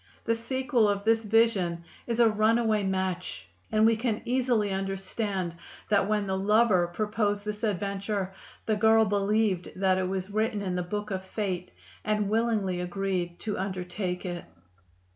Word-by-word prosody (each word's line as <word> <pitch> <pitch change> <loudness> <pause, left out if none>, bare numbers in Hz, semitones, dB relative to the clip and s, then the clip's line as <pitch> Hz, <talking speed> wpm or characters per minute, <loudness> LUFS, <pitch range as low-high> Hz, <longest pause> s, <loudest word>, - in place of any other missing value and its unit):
The 230 - +2
sequel 245 -1 +1
of 200 0 -1
this 225 +1 +3
vision 205 -6 +2 0.2
is 235 -1 -1
a 235 - +7
runaway 220 0 +2
match, 185 - -2 0.2
and 215 0 +4
we 225 0 +5
can 220 -1 -2
easily 240 -5 +1
understand 195 -1 -2 0.3
that 200 -2 +3
when 210 -1 +1
the 190 -1 -1
lover 210 -3 +4
proposed 205 +2 -1
this 210 0 -4
adventure, 200 -1 -2 0.3
the 215 - +1
girl 220 +1 +5
believed 205 -2 +1
that 185 -1 +2
it 185 - 0
was 190 +1 -3
written 215 -1 0
in 185 -2 -2
the 180 - 0
book 205 +4 -4
of 190 -1 -2
fate 190 -2 -3 0.3
and 210 -1 0
willingly 215 -5 +1
agreed 180 -1 -2
to 210 -3 -3
undertake 185 0 -3
it. 175 -1 -4
205 Hz, 155 wpm, -28 LUFS, 190-220 Hz, 0.3 s, a